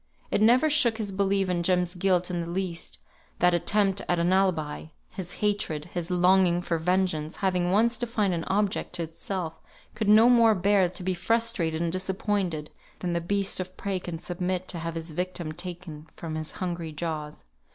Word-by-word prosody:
It -, -, +1 dB
never 245 Hz, +7 st, +5 dB
shook 270 Hz, -7 st, +4 dB
his 210 Hz, -3 st, -3 dB
belief 195 Hz, 0 st, +1 dB
in 180 Hz, -1 st, 0 dB
Jem's 180 Hz, 0 st, +1 dB
guilt 180 Hz, -1 st, +1 dB
in 175 Hz, -1 st, -1 dB
the 170 Hz, -, -5 dB
least, 170 Hz, -, -4 dB, 0.4 s
that 180 Hz, 0 st, +4 dB
attempt 195 Hz, +2 st, +2 dB
at 175 Hz, -, +2 dB
an 170 Hz, +2 st, +2 dB
alibi; 170 Hz, -7 st, +1 dB, 0.3 s
his 185 Hz, -2 st, -6 dB
hatred, 180 Hz, -8 st, -1 dB
his 175 Hz, -1 st, -3 dB
longing 180 Hz, -1 st, +3 dB
for 165 Hz, -2 st, -1 dB
vengeance, 175 Hz, -3 st, 0 dB
having 180 Hz, -3 st, 0 dB
once 230 Hz, +5 st, +3 dB
defined 220 Hz, -5 st, 0 dB
an 165 Hz, -1 st, -2 dB
object 200 Hz, -1 st, -1 dB
to 175 Hz, -1 st, -2 dB
itself, 165 Hz, +1 st, -5 dB, 0.3 s
could 215 Hz, -1 st, -1 dB
no 220 Hz, +3 st, +7 dB
more 230 Hz, -3 st, +6 dB
bear 190 Hz, -1 st, +3 dB
to 180 Hz, 0 st, -9 dB
be 185 Hz, +1 st, 0 dB
frustrated 180 Hz, -4 st, 0 dB
and 170 Hz, -, 0 dB
disappointed 185 Hz, -3 st, -2 dB, 0.3 s
than 175 Hz, -2 st, -3 dB
the 170 Hz, -, 0 dB
beast 195 Hz, +3 st, -1 dB
of 185 Hz, 0 st, -6 dB
prey 195 Hz, -2 st, -2 dB
can 175 Hz, -2 st, -6 dB
submit 180 Hz, +2 st, -3 dB
to 175 Hz, -, -2 dB
have 165 Hz, 0 st, -4 dB
his 165 Hz, 0 st, -5 dB
victim 175 Hz, -1 st, -3 dB
taken 170 Hz, -2 st, -7 dB
from 165 Hz, -2 st, -6 dB
his 155 Hz, 0 st, -4 dB
hungry 170 Hz, -3 st, -4 dB
jaws. 150 Hz, -, -5 dB
180 Hz, 185 wpm, -27 LUFS, 170-195 Hz, 0.4 s, no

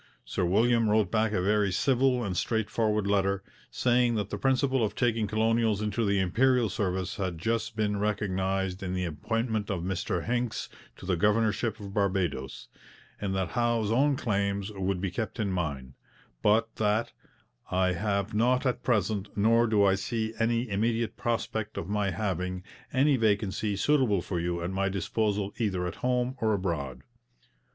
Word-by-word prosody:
Sir -, -, -2 dB
William 115 Hz, +5 st, +3 dB
wrote 105 Hz, -3 st, +2 dB
back 110 Hz, -1 st, +2 dB
a 90 Hz, -4 st, 0 dB
very 105 Hz, 0 st, +2 dB
civil 130 Hz, +4 st, +2 dB
and 95 Hz, -4 st, -2 dB
straight 110 Hz, +2 st, -1 dB
forward 105 Hz, -2 st, +1 dB
letter, 100 Hz, -1 st, +1 dB, 0.3 s
saying 120 Hz, -1 st, +2 dB
that 105 Hz, -2 st, -2 dB
the -, -, -2 dB
principle 130 Hz, -1 st, +2 dB
of 105 Hz, -, -1 dB
taking 115 Hz, -3 st, +1 dB
colonials 110 Hz, 0 st, +1 dB
into 105 Hz, +2 st, -1 dB
the 100 Hz, -1 st, +2 dB
Imperial 115 Hz, +5 st, +2 dB
service 95 Hz, -1 st, -2 dB
had 95 Hz, -4 st, -2 dB
just 115 Hz, +5 st, -1 dB
been 105 Hz, -2 st, 0 dB
recognized 95 Hz, -2 st, -1 dB
in 95 Hz, -1 st, -3 dB
the 90 Hz, 0 st, -1 dB
appointment 110 Hz, +7 st, -2 dB
of 90 Hz, -4 st, -2 dB
Mr 95 Hz, -1 st, -2 dB
Hincks 120 Hz, -1 st, -2 dB, 0.3 s
to -, -, -11 dB
the 90 Hz, -1 st, +1 dB
governorship 105 Hz, +3 st, +1 dB
of 100 Hz, -1 st, -8 dB
Barbados, 95 Hz, -9 st, -1 dB, 0.5 s
and 95 Hz, -2 st, -2 dB
that 95 Hz, -3 st, -1 dB
Howe's 115 Hz, +1 st, 0 dB
own 140 Hz, +5 st, +3 dB
claims 100 Hz, -3 st, -1 dB
would 95 Hz, -2 st, -2 dB
be 95 Hz, -2 st, -2 dB
kept 110 Hz, +4 st, -4 dB
in 105 Hz, -3 st, 0 dB
mind, 70 Hz, -8 st, -3 dB, 0.5 s
but 110 Hz, +2 st, +2 dB
that 105 Hz, +1 st, +1 dB, 0.6 s
'I 90 Hz, 0 st, +2 dB
have 100 Hz, +2 st, -1 dB
not 125 Hz, +5 st, +2 dB
at 125 Hz, -, 0 dB
present, 105 Hz, -4 st, 0 dB
nor 115 Hz, +3 st, +4 dB
do 105 Hz, -2 st, +3 dB
I 95 Hz, -, +5 dB
see 110 Hz, +3 st, -2 dB
any 115 Hz, +2 st, +1 dB
immediate 115 Hz, +2 st, 0 dB
prospect 110 Hz, -2 st, -2 dB
of 85 Hz, -, -4 dB
my 105 Hz, 0 st, 0 dB
having, 90 Hz, -2 st, -2 dB, 0.3 s
any 135 Hz, +1 st, +3 dB
vacancy 105 Hz, -2 st, 0 dB
suitable 110 Hz, -5 st, +2 dB
for 90 Hz, -1 st, -3 dB
you 85 Hz, 0 st, -2 dB
at 85 Hz, -, -2 dB
my 95 Hz, +1 st, 0 dB
disposal 100 Hz, +1 st, -1 dB
either 95 Hz, -6 st, 0 dB
at 90 Hz, -, -5 dB
home 125 Hz, +1 st, 0 dB
or 110 Hz, -1 st, +2 dB
abroad.' 70 Hz, -9 st, -3 dB
105 Hz, 165 wpm, -28 LUFS, 95-115 Hz, 0.6 s, I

